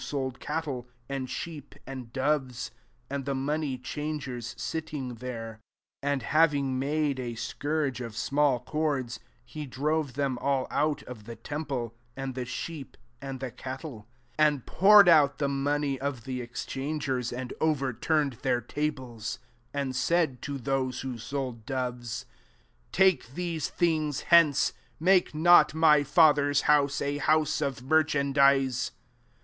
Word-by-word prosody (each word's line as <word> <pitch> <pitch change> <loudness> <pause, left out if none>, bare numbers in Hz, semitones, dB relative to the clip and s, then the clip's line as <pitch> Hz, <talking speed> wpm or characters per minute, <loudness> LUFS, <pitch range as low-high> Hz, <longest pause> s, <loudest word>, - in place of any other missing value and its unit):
sold 130 -3 -3
cattle, 140 -7 -3 0.2
and 135 -2 -3
sheep^ 150 -1 -7
and 130 -4 -8
doves; 130 -2 -1 0.4
and 140 0 -4
the 140 -1 -1
money 140 0 -1
changers 130 -3 -5
sitting 150 -6 -4
there: 115 -2 -6 0.4
15 145 0 0
anc^ - - -12
having 140 -3 +2
made 145 0 0
a 120 -2 -4
scourge 145 +2 -2
o£ 120 -2 -5
small 140 +4 +1
cords, 140 -3 -2 0.3
he 145 +5 -7
drove 145 +1 -1
them 135 -3 -1
all 135 -1 +1
out 150 0 0
of 110 -4 -10
the 115 0 -7
tem 145 +7 -5
ple, 120 -5 -3 0.2
and 135 -1 -4
the 125 0 -4
sheep^ 140 +3 -6 0.3
and 135 -1 -5
the 130 -2 -4
cat> 130 +2 -7
tie; 135 -10 -8 0.4
and 150 -4 +3
poured 205 0 +7
out 150 -4 +6
the 140 - 0
money 140 0 0
of 135 -4 -3
the 130 -1 -4
excbangers, 130 +1 -3
and 125 +1 -5
ovei> 140 -6 0
turned 150 -4 +2
their 125 -2 +1
tables; 125 -5 -4 0.3
16 - - -37
and 130 -2 -3
said 155 0 +1
to 140 -1 -4
those 130 -1 -1
who 130 -3 -5
sold 125 -1 -4
doves, 125 -3 -3 0.4
" - - -36 0.3
Take 180 -9 +3
these 170 -4 -2
things 155 -4 0
hence; 165 -5 +5 0.3
make 180 -1 +3
not 170 0 +6
my 155 -2 +6
Father's 145 -2 +4
house 145 -1 +3
a 145 +1 -1
house 155 0 +2
of 135 -4 -2
merchandise." 140 -3 +3
140 Hz, 145 wpm, -28 LUFS, 130-150 Hz, 0.4 s, poured